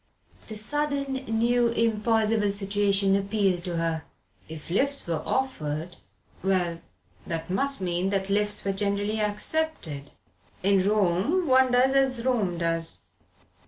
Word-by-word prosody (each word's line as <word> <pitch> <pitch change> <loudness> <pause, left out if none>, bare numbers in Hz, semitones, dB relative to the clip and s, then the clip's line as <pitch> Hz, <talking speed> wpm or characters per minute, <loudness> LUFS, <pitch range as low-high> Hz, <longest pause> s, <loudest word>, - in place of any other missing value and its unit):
The 220 - -5
sudden 280 +4 -1
new 235 +2 +2
impossible 225 -2 +1
situation 200 -1 +2
appealed 195 -3 0
to 175 -2 -3
her. 165 -1 -1 0.5
If 160 +1 -8
lifts 280 +8 0
were 165 -2 -2
offered 165 - -2 0.4
well 175 -3 0 0.5
that 165 0 -4
must 275 +6 0
mean 180 +1 -1
that 195 -1 -1
lifts 205 +1 0
were 195 - 0
generally 205 +2 0
accepted. 210 - -1 0.5
In 195 0 +3
Rome 210 - +1
one 260 -2 +4
does 255 +2 +4
as 265 -3 +1
Rome 210 -9 0
does. 165 -1 0
205 Hz, 125 wpm, -26 LUFS, 180-240 Hz, 0.5 s, one